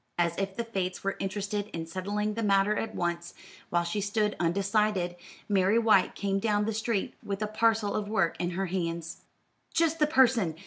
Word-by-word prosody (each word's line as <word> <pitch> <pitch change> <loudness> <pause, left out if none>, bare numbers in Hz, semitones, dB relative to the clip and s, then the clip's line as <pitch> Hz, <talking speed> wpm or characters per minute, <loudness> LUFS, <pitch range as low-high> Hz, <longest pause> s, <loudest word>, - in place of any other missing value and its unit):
As 170 -1 +1
if 195 -1 -2
the 235 - -2
fates 190 -5 -3
were 195 - -1
interested 200 +1 -2
in 165 -1 -4
settling 205 +5 -2
the 230 - -3
matter 200 0 +3
at 225 - -3
once, 170 0 -2 0.3
while 175 0 +2
she 170 +5 -2
stood 210 +1 0
undecided, 195 +1 +1 0.3
Mary 200 +1 +3
White 225 -2 +4
came 195 -1 0
down 210 0 +1
the 225 - -1
street 220 -1 -1
with 200 +1 -3
a - - -1
parcel 220 -1 +1
of 210 -1 -2
work 190 -6 +1
in 175 - 0
her 195 - 0
hands. 170 -2 -3 0.6
"Just 330 -1 +2
the 300 - +4
person! 240 - +3
200 Hz, 185 wpm, -29 LUFS, 180-215 Hz, 0.6 s, White